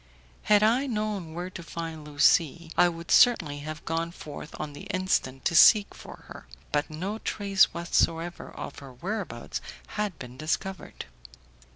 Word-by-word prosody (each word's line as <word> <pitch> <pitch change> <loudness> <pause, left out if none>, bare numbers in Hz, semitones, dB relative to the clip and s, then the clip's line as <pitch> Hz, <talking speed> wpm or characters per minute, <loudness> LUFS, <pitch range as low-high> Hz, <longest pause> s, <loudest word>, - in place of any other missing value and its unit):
Had 210 0 +5
I 245 +6 +3
known 210 -8 -3
where 180 +2 -5
to 175 - -8
find 165 -1 -6
Lucie, 155 +2 +2
I 175 - +5
would 165 0 -7
certainly 170 - +5
have 155 +2 -7
gone 165 +1 -1
forth 150 -2 -9
on 145 - -5
the 145 - -10
instant 185 -9 -1
to - - +2
seek 205 +4 +7
for - - -12
her, - - -11 0.2
but 145 0 0
no 185 +8 -4
trace 200 -3 +3
whatever 170 0 -1
of - - -8
her 135 -2 -11
whereabouts 195 - -5 0.3
had 210 -6 -3
been 125 0 -10
discovered. 170 +5 -4
170 Hz, 155 wpm, -27 LUFS, 155-195 Hz, 0.3 s, seek